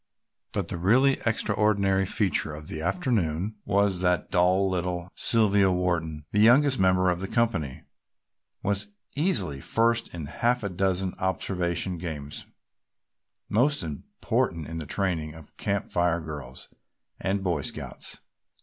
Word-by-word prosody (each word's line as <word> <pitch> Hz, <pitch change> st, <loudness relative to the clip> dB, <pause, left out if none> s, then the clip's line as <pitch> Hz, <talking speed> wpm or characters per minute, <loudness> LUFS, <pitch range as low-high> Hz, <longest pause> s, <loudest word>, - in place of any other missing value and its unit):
But -, -, -2 dB
the -, -, -3 dB
really 130 Hz, +9 st, +4 dB
extraordinary 100 Hz, -3 st, +2 dB
feature 95 Hz, -7 st, +2 dB
of 75 Hz, 0 st, -7 dB
the 80 Hz, -, -4 dB
afternoon 100 Hz, -, 0 dB
was 100 Hz, -2 st, +2 dB
that 90 Hz, -2 st, +1 dB
dull 90 Hz, +2 st, +3 dB
little 90 Hz, -1 st, -2 dB
Sylvia 100 Hz, -4 st, +3 dB
Wharton, 85 Hz, -4 st, -1 dB
the 105 Hz, -, +1 dB
youngest 130 Hz, +5 st, +5 dB
member 95 Hz, -1 st, +4 dB
of 90 Hz, -, -2 dB
the 95 Hz, -, -3 dB
company, 105 Hz, -, -1 dB, 0.8 s
was 100 Hz, 0 st, -1 dB, 0.3 s
easily 145 Hz, -, 0 dB
first 115 Hz, -, +1 dB
in 80 Hz, -4 st, -6 dB
half 120 Hz, +10 st, 0 dB
a 100 Hz, -, -1 dB
dozen 95 Hz, 0 st, 0 dB
observation 90 Hz, -1 st, -1 dB
games 75 Hz, -4 st, -6 dB, 1.0 s
most 140 Hz, +7 st, +2 dB
important 80 Hz, +1 st, -2 dB
in 80 Hz, +2 st, -5 dB
the 75 Hz, -, -6 dB
training 80 Hz, -6 st, -1 dB
of 80 Hz, -2 st, -12 dB
Camp 100 Hz, 0 st, -2 dB
Fire 85 Hz, -1 st, +2 dB
girls 75 Hz, -6 st, -8 dB, 0.5 s
and 95 Hz, 0 st, -1 dB
Boy 85 Hz, -6 st, 0 dB
Scouts. -, -, -6 dB
95 Hz, 130 wpm, -27 LUFS, 80-105 Hz, 1.0 s, youngest